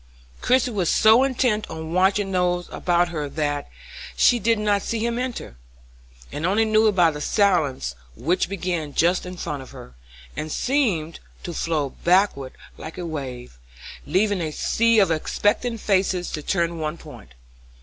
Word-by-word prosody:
Christie 255 0 +2
was 190 -6 0
so 220 +4 +5
intent 245 -5 0
on 160 0 -6
watching 195 +2 +2
those 180 -1 0
about 175 0 +1
her 150 -4 -4
that 145 -1 -2 0.5
she 245 - +4
did 230 +2 +2
not 205 -1 +1
see 225 +2 -2
him 235 0 -1
enter, 250 - -5 0.7
and 150 - -5
only 200 +6 +2
knew 220 0 +3
it 210 - +3
by 175 -4 +4
the 150 -1 -7
silence 155 - +1 0.2
which 175 - 0
began 175 -6 -3
just 175 +2 +2
in 180 0 -8
front 150 -5 -4
of 130 - -12
her, 60 - -12 0.4
and 155 0 -5
seemed 205 - 0 0.2
to 175 - -5
flow 155 -4 -1
backward 175 -7 +2 0.3
like 160 - -8
a 180 - -5
wave, 125 - -7 0.5
leaving 190 +4 +1
a 160 - -2
sea 230 +8 +1
of 195 -5 +4
expectant 205 +8 0
faces 185 -3 0
turning 170 +2 -1
to - - -6
one 155 +1 -3
point. - - -13
180 Hz, 160 wpm, -23 LUFS, 155-210 Hz, 0.7 s, so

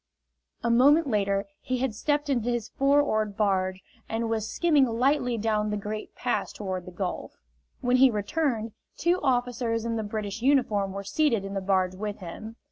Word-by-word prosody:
A 235 - +2
moment 285 +7 +5
later 200 -5 0 0.2
he 255 - -2
had 255 -2 -1
stepped 290 +6 0
into 245 -4 0
his 240 -2 -2
four 280 +1 +3
oared 215 -6 -1
barge 190 -2 0 0.3
and 225 0 -1
was 220 -1 -1
skimming 305 -6 +3
lightly 245 +1 +1
down 215 -1 0
the 210 - -1
Great 210 +1 -6
Pass - - -1
toward 185 -3 -5
the - - -7
Gulf. 180 0 -4 0.5
When 250 -1 +3
he 265 +1 +7
returned, 225 +1 -1 0.3
two 345 +3 +1
officers 245 -3 0
in 230 -1 -1
the 220 - -2
British 210 0 -4
uniform 235 -7 +2
were 200 0 -5
seated 230 0 +1
in 195 - -6
the 195 - -2
barge 185 -1 +1
with 205 +2 -4
him. 215 +5 -8
225 Hz, 180 wpm, -27 LUFS, 200-255 Hz, 0.5 s, he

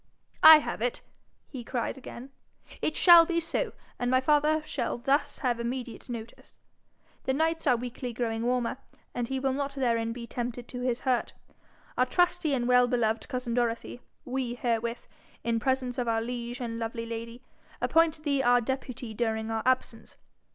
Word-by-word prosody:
'I 315 0 +11
have - - -5
it!' - - -2 0.4
he 260 -5 -8
cried 240 0 -3
again. 265 0 -10 0.5
'It 310 - -1
shall 345 -2 +9
be 335 0 0
so, 330 0 -2 0.3
and 245 - 0
my 255 0 +4
father 300 +3 +2
shall 260 -6 -2
thus 285 +3 0
have 240 -2 +1
immediate 240 0 -5
notice. 235 -1 -9 0.7
The 265 - +1
nights 325 +1 0
are 250 - +5
weekly 245 +1 -5
growing 225 -1 -2
warmer, 250 +1 0 0.3
and 245 -1 -2
he 265 +1 -2
will 265 0 0
not 280 0 -3
therein 230 -4 0
be 235 0 -6
tempted 240 0 -5
to 250 - -6
his 250 -1 -1
hurt. 255 -3 0 0.7
Our 255 - +4
trusty 345 -2 +2
and 240 -2 -1
well 250 0 +5
beloved 230 -3 0
cousin 250 -3 -3
Dorothy, 240 0 -1 0.2
we 250 -2 -2
herewith, 235 -1 -2 0.4
in 230 0 0
presence 260 +1 -1
of 245 - -1
our 225 -1 +2
liege 240 +1 -5
and 230 -1 -4
lovely 230 0 -4
lady, 230 +2 -7 0.4
appoint 325 -1 +2
thee 280 -3 +1
our 245 -1 +5
deputy 250 -2 -4
during 220 0 -1
our 225 0 -1
absence. 255 -3 -1
245 Hz, 170 wpm, -28 LUFS, 235-270 Hz, 0.7 s, I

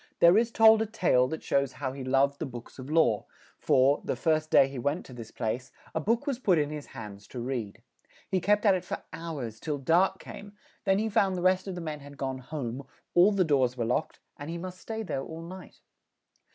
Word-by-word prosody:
There 170 +2 +7
is 230 +2 +3
told 220 -1 +6
a 220 - 0
tale 150 - +2
that 160 +4 -5
shows 140 -1 +1
how 135 -2 -4
he 135 -1 -6
loved 135 +2 +2
the 160 - -3
books 120 +1 -10
of 130 +2 -8
law; 155 -9 +2 0.3
for, 135 +3 +3
the - - -2
first 155 -1 +1
day 135 - +6
he 135 -2 -7
went 145 +7 -1
to 130 - -12
this 115 -2 -9
place, 125 +3 -3 0.2
a - - 0
book 230 +8 0
was 275 -4 -2
put 190 -9 +3
in 150 -1 0
his 150 -2 -6
hands 100 -2 -10
to 125 - -7
read; 120 -5 -4 0.4
he 185 - 0
kept 210 +4 +2
at 200 - +6
it 185 -1 -1
for - - -5
hours, 140 -10 -6
till 150 -2 -3
dark 175 +8 +2
came; 205 +1 -10 0.3
then 195 -1 +3
he 220 +2 0
found 195 -3 +2
the 175 - -3
rest 185 +1 +2
of 190 - -4
the 175 - -5
men 155 -2 -5
had 145 0 -12
gone 130 -1 -3
home; 130 -2 -5 0.3
all 180 +4 +6
the 195 -2 +2
doors 130 -5 +2
were 120 - -1
locked; 125 +7 -1 0.2
and 145 +2 -7
he 170 - -4
must 180 +1 -7
stay 225 0 -4
there 160 -9 -3
all 160 +4 -8
night. 185 +2 -11
155 Hz, 230 wpm, -28 LUFS, 130-185 Hz, 0.4 s, There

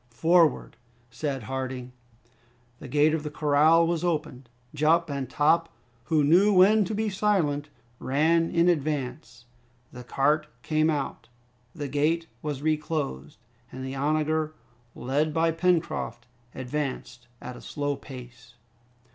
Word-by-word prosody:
"Forward!" 165 +4 +2 0.3
said 135 0 -3
Harding. 130 +1 -5 0.9
The - - -9
gate 150 +1 +3
of 160 - 0
the 150 - -5
corral 150 +3 +4
was 170 0 -1
opened. 150 -7 -3 0.2
Jup 155 +2 +2
and 135 -3 -4
Top, 165 +4 +2 0.4
who 155 +2 +2
knew 180 +8 +5
when 200 +2 +5
to 215 - -3
be 220 +1 -1
silent, 185 -8 0 0.3
ran 160 +5 +2
in 170 +1 +2
advance. 145 -5 -2 0.5
The 125 - -10
cart 150 +5 +1 0.2
came 155 0 +1
out, 145 -5 -3 0.5
the 145 -3 -4
gate 155 +4 0 0.2
was 145 -2 -4
reclosed, 150 - -2 0.3
and 130 0 -7
the 130 - -5
onager, 155 +2 0 0.4
led 150 +4 -1
by 165 0 +3
Pencroft, 165 -7 -1 0.3
advanced 130 -2 -5
at 125 - -8
a - - -11
slow 145 -1 -3
pace. 125 -3 -12
150 Hz, 130 wpm, -26 LUFS, 135-165 Hz, 0.9 s, knew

